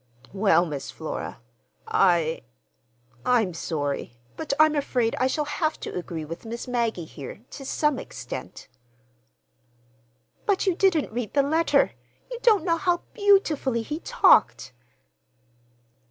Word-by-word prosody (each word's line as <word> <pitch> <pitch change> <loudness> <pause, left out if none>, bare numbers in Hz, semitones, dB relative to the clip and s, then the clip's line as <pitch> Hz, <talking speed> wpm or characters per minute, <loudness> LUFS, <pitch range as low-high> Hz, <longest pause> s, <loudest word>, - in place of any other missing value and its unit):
"Well, 195 -4 +4
Miss 140 -4 -5
Flora, 160 -6 -6 0.5
I—I'm 120 - -1
sorry, 145 -7 -3 0.2
but 320 - -4
I'm 310 0 +6
afraid 250 -6 0
I 255 - +3
shall 300 +3 -1
have 310 +2 -1
to - - -5
agree 170 -3 -5
with 165 +3 -8
Miss 235 +2 -6
Maggie 235 -8 -1
here, 145 +5 -9
to 275 - -8
some 295 0 0
extent." - - -8 1.8
"But 405 -1 +2
you 380 - +3
didn't 345 - +2
read 235 0 -4
the 280 - +4
letter. 320 +4 +2 0.4
You - - -5
don't 430 -8 +4
know 335 -2 +2
how 345 +1 0
beautifully 320 - +2
he 300 +7 -4
talked." - - +3
235 Hz, 125 wpm, -25 LUFS, -, 1.8 s, I'm